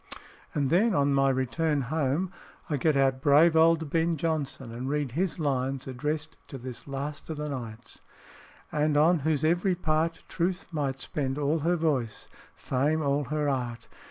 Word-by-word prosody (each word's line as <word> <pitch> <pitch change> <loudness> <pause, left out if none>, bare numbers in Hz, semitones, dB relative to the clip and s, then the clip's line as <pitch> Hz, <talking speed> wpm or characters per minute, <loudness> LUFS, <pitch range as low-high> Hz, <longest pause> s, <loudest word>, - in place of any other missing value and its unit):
And 140 -2 +1
then 205 +5 +4
on 140 0 +3
my 135 0 +3
return 140 +4 0
home, 155 +6 -1 0.4
I 145 - +1
get 150 +1 +2
out 135 -1 +2
brave 155 +3 +5
old 160 -2 +4
Ben 165 0 +1
Jonson, 140 -6 -2
and 125 +3 -4
read 145 -3 -1
his 175 +7 -1
lines 135 -3 -1
addressed 150 +4 -3
to 135 - -7
this 125 +1 -9
last 140 +2 -5
of 160 - -4
the 150 0 -3
knights: 120 -5 -7 0.4
"... - - -24
and 150 0 +1
on 165 +3 +5
whose 150 0 0
every 175 +4 +2
part 165 -1 0
Truth 180 +2 -1
might 135 -3 -2
spend 135 -2 -2
all 150 +2 +1
her 170 +4 +1
voice, 140 -10 -1 0.3
Fame 150 +4 0
all 140 0 +1
her 150 +2 -1
art. 125 -4 -2
145 Hz, 170 wpm, -28 LUFS, 135-160 Hz, 0.4 s, brave